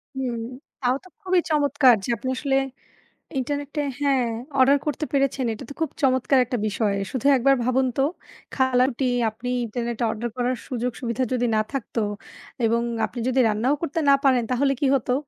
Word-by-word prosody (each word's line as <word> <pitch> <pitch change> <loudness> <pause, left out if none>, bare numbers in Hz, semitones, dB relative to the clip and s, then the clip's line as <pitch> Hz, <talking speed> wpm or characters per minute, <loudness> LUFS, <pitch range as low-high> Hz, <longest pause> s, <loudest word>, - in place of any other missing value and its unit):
হু, 265 - -3 0.6
তাও 250 0 +2
তো - - -15
খুবই 370 -1 +2
চমৎকার 285 -4 +4
যে - - -6
আপনি 255 +5 -4
আসলে, 270 0 0 0.8
ইন্টারনেটে 285 +2 -2 0.2
হ্যাঁ 275 -3 +2 0.4
অর্ডার 270 +2 +6
করতে 300 +1 -1
পেরেছেন, 275 -1 +1
এটা 220 - -7
তো - - -4
খুব 320 - 0
চমৎকার 260 0 +3
একটা 245 0 -3
বিষয়। 210 -1 0 0.2
শুধু 260 +1 -2
একবার 275 +2 +4
ভাবুন 255 +2 +2
তো - - +4 0.5
খালাটি 260 0 +2 0.3
আপনি 235 +3 -7 0.2
ইন্টারনেটে 235 +1 -3
অর্ডার 230 +2 -3
করার 250 +1 0
সুযোগ 250 -1 -2
সুবিধা 235 0 -2
যদি 245 -1 +1
না - - +3
থাকতো 255 -3 -3 0.6
এবং 230 +1 +2 0.2
আপনি 245 - -10
যদি 260 +1 +2
রান্নাও 220 +6 +1
করতে 330 -1 -2
না 280 - +8
পারেন, 260 -3 +4
তাহলে 275 +2 +2
কি 285 - +2
হতো? 250 -2 0
255 Hz, 170 wpm, -24 LUFS, 240-275 Hz, 0.8 s, না